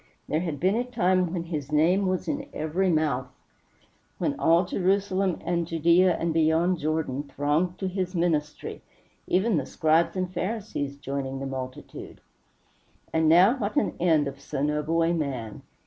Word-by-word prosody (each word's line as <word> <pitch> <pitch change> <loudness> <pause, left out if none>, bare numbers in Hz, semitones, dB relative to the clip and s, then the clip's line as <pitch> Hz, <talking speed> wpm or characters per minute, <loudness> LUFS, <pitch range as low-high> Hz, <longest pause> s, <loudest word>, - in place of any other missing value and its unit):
There 155 - 0
had 165 -5 -3
been 185 +5 +2
a 235 +3 +1
time 185 -7 +1
when 170 -2 -2
his 155 -4 -5
name 175 +6 +3
was 185 -1 -1
in 285 -1 -3
every 170 +5 0
mouth; 155 -6 +1 0.9
when - - 0
all 170 +3 +4
Jerusalem 190 0 0
and 170 -1 0
Judæa, 170 +2 +3
and 165 -1 -1
beyond 165 +2 +2
Jordan, 150 -3 -1
thronged 150 +5 -1
to 190 - -3
his 185 0 -3
ministry 155 -4 -1 0.5
even 190 +1 +2
the 140 - -1
Scribes 160 +2 +2
and 185 -1 -2
Pharisees 185 -8 -3
joining 135 -1 -4
the 135 - -4
multitude. 130 -1 -7 0.9
And 160 -1 +3
now 185 - +6
what 205 +2 -2
an 290 - +1
end 160 -4 +3
of 140 0 -7
so 140 0 -4
noble 150 +3 +1
a 165 +1 +2
man! 130 -9 -3
165 Hz, 160 wpm, -26 LUFS, 150-185 Hz, 0.9 s, now